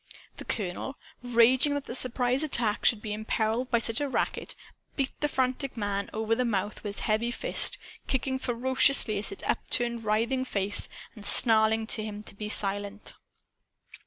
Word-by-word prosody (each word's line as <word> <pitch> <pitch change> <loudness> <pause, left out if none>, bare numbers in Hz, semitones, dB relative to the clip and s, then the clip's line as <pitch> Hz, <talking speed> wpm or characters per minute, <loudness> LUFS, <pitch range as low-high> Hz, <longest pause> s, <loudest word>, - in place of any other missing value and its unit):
The - - -8
colonel, 205 +6 -3 0.3
raging 245 +4 +4
that 285 - -3
the - - -6
surprise 250 +1 +1
attack 235 -8 +1
should 215 -2 +4
be 210 - -3
imperiled 220 +3 -1
by 235 - +3
such 230 +2 +1
a 285 - -1
racket, - - -2 0.4
beat 275 -2 -1
the 295 - +1
frantic 260 -1 -1
man 200 -2 -2
over 220 +1 -1
the 250 +2 +1
mouth 210 -3 -2
with 205 -1 -4
his - - -3
heavy 220 +2 +1
fist, 240 - +1 0.3
kicking 265 0 -1
ferociously 250 -3 +2
at 210 - -5
his 195 - -8
upturned 235 -1 0
writhing 230 +5 +1
face, 200 -4 0 0.3
and 210 - -11
snarling 220 0 +4
to 220 -1 0
him 210 -1 -6
to - - -10
be 210 +1 -6
silent. 205 0 0
230 Hz, 165 wpm, -28 LUFS, 210-255 Hz, 0.4 s, raging